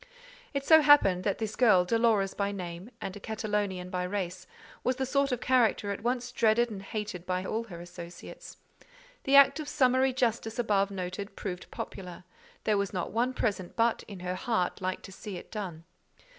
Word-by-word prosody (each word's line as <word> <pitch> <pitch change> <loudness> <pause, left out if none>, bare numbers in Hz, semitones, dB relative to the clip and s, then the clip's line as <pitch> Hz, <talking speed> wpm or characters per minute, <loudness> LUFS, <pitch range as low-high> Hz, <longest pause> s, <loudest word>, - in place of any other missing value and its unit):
It 275 0 -1
so 320 -1 +8
happened 285 -12 +5
that 200 - +1
this 220 -2 -3
girl, 210 -8 +5
Dolores 220 -2 +2
by 200 0 -1
name, 180 +1 -6
and 190 - -5
a - - -8
Catalonian 205 -4 -2
by 180 - -1
race, 185 -1 -4 0.4
was 255 - +1
the 265 +1 -1
sort 275 +1 +1
of 250 -1 -1
character 235 -5 +2
at 200 - -4
once 245 +1 -1
dreaded 235 0 +3
and 195 -2 -6
hated 205 -3 -5
by 185 +1 -2
all 225 +4 -2
her 175 -6 -9
associates; 175 0 -10 0.7
the 275 - +4
act 280 +3 +7
of 300 -2 -5
summary 260 -2 +3
justice 230 -3 -1
above 205 -4 +2
noted 195 +1 -5
proved 185 -3 -6
popular: 180 -2 -7 0.4
there 210 -2 +2
was 200 -1 -1
not 180 -3 -3
one 240 +3 +1
present 195 -6 -2
but, 230 0 +2
in 195 -4 -9
her 180 0 -2
heart, 185 -2 -1
liked 185 0 -2
to 195 - -10
see 195 0 -7
it - - -11
done. 185 -7 -5
205 Hz, 185 wpm, -29 LUFS, 185-240 Hz, 0.7 s, so